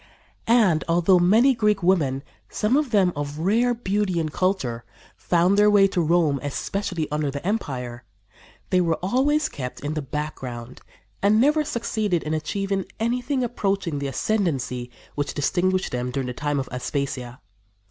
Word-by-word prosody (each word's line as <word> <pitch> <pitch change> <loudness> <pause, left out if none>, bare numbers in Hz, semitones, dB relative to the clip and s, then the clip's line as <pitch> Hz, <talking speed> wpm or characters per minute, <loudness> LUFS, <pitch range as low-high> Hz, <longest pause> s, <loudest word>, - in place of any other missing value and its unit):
And, 215 -9 +4
although 175 +2 +4
many 220 +10 +5
Greek 210 -4 +1
women, 145 -7 +2 0.3
some 215 +5 +1
of 295 -2 +1
them 195 -6 +3
of 145 0 -4
rare 230 +9 +2
beauty 200 -5 -1
and 155 -2 -3
culture, 140 -12 -1 0.3
found 180 +3 +2
their 210 0 +6
way 205 -1 +6
to 185 -2 0
Rome, 160 -3 +2
especially 165 +3 -3
under 150 -1 0
the 140 +3 -6
empire, 125 - -3 0.7
they 185 - +4
were 165 -2 +1
always 285 +9 +2
kept 125 -3 -6
in 145 +2 -3
the 155 - -2
background 130 -4 -6 0.4
and 205 +2 +4
never 300 +5 +3
succeeded 215 - -1
in 155 - -2
achieving 195 +5 -2
anything 250 +4 0
approaching 195 -9 -1
the 140 - -2
ascendancy 135 - -1 0.2
which 145 -1 -3
distinguished 185 +5 0
them 125 0 -2
during 130 +1 -2
the 125 - -4
time 145 +2 -1
of 135 - -3
Aspasia. 125 -1 -4
175 Hz, 155 wpm, -24 LUFS, 140-210 Hz, 0.7 s, their